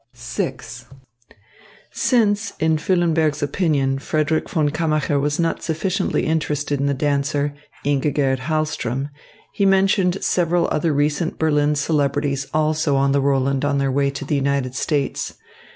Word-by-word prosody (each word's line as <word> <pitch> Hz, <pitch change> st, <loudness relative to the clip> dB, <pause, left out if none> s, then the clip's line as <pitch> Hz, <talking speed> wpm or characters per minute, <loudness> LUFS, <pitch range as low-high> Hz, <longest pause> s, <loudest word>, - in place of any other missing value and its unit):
VI 120 Hz, 0 st, -3 dB, 1.4 s
Since, 220 Hz, -3 st, +1 dB
in 160 Hz, 0 st, +2 dB
Füllenberg's 160 Hz, -3 st, +1 dB
opinion, 140 Hz, -3 st, 0 dB
Frederick 155 Hz, +2 st, -1 dB
von 155 Hz, -6 st, +1 dB
Kammacher 155 Hz, -2 st, 0 dB
was 145 Hz, +2 st, -1 dB
not 165 Hz, -1 st, 0 dB
sufficiently 185 Hz, +4 st, -1 dB
interested 150 Hz, -2 st, -1 dB
in 140 Hz, -, 0 dB
the 140 Hz, -, +1 dB
dancer, 145 Hz, +1 st, 0 dB, 0.3 s
Ingigerd 140 Hz, -1 st, +1 dB
Hahlström, 145 Hz, -2 st, -2 dB, 0.4 s
he 200 Hz, -, -1 dB
mentioned 195 Hz, -1 st, +2 dB
several 175 Hz, -1 st, +1 dB
other 155 Hz, +1 st, +1 dB
recent 150 Hz, +3 st, 0 dB
Berlin 150 Hz, -1 st, +2 dB
celebrities 140 Hz, -2 st, 0 dB
also 155 Hz, -1 st, +1 dB
on 135 Hz, 0 st, +2 dB
the 140 Hz, 0 st, +2 dB
Roland 135 Hz, 0 st, +1 dB
on 145 Hz, 0 st, +1 dB
their 135 Hz, -1 st, +1 dB
way 140 Hz, +1 st, +1 dB
to 140 Hz, 0 st, -6 dB
the 150 Hz, -, -2 dB
United 140 Hz, -2 st, 0 dB
States. 140 Hz, +1 st, -2 dB
150 Hz, 135 wpm, -21 LUFS, 140-160 Hz, 1.4 s, in